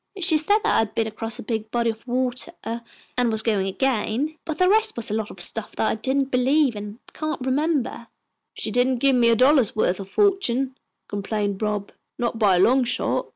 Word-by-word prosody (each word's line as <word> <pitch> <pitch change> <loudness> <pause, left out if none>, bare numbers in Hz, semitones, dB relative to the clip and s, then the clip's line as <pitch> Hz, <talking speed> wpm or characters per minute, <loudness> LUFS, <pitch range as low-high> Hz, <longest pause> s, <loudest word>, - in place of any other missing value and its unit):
"She 350 -3 +5
said 365 +8 +4
that - - -4
I - - +4
had 220 -1 -1
been 225 - +1
across 225 +1 -3
a - - -7
big 220 -1 -3
body 235 0 +1
of 225 +3 -14
water 255 +5 -2
and 235 +1 -4
was 220 0 0
going 205 -4 +1
again, 265 +6 -1
but 320 -2 -4
the 365 - +3
rest 435 +3 +3
was 235 -2 -2
a - - -1
lot 215 -1 -2
of 185 - -11
stuff 210 +5 -2
that 220 - 0
I - - +1
didn't 265 +4 -1
believe 260 +1 +2
and 205 +1 -7 0.2
can't 310 -5 -4
remember." 270 -3 -1 0.5
"She 220 - -3
didn't 245 +3 +2
give 270 +2 +3
me 240 -1 +4
a 230 - +5
dollar's 255 -2 +4
worth 190 -3 +1
of 195 -1 -8
fortune," 270 - +1 0.3
complained 205 0 -3
Rob. 210 -2 -2 0.3
"Not 235 -2 -2
by 200 -4 +4
a - - +2
long 255 +7 +4
shot." 245 - -1
235 Hz, 210 wpm, -23 LUFS, 215-270 Hz, 0.5 s, She